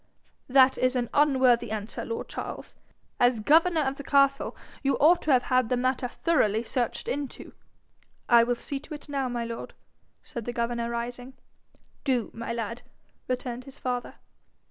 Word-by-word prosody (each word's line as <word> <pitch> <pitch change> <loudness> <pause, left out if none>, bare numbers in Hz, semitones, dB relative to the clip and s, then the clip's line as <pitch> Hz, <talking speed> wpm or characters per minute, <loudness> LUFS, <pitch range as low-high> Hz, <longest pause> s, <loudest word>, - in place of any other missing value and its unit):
'That 265 0 +5
is 255 0 +2
an 245 -1 0
unworthy 260 -6 +4
answer, 215 0 -4
lord 460 - -4
Charles. - - -7 0.4
As 245 -2 +4
governor 320 +7 +4
of 270 -1 -1
the 280 - -7
castle, 275 0 +2 0.2
you 275 -1 +2
ought 335 +4 +5
to 305 - 0
have 250 -2 +4
had 255 -3 +2
the 250 - +1
matter 255 0 0
thoroughly 235 -7 +1
searched 240 0 -2
into.' 285 -1 -5 0.7
'I 235 -1 +7
will 245 0 +1
see 275 +3 -5
to 300 +2 -8
it 295 - -12
now, 275 -3 -1
my 240 -1 -2
lord,' 230 0 -7 0.5
said 235 -2 -7
the 240 - -3
governor, 235 0 -1
rising. 245 +2 -5 0.7
'Do, 250 -5 0
my 230 0 -5
lad,' 230 0 -4 0.5
returned 250 -1 -3
his 275 +1 -11
father. 250 -1 -3
250 Hz, 165 wpm, -27 LUFS, 235-275 Hz, 0.7 s, I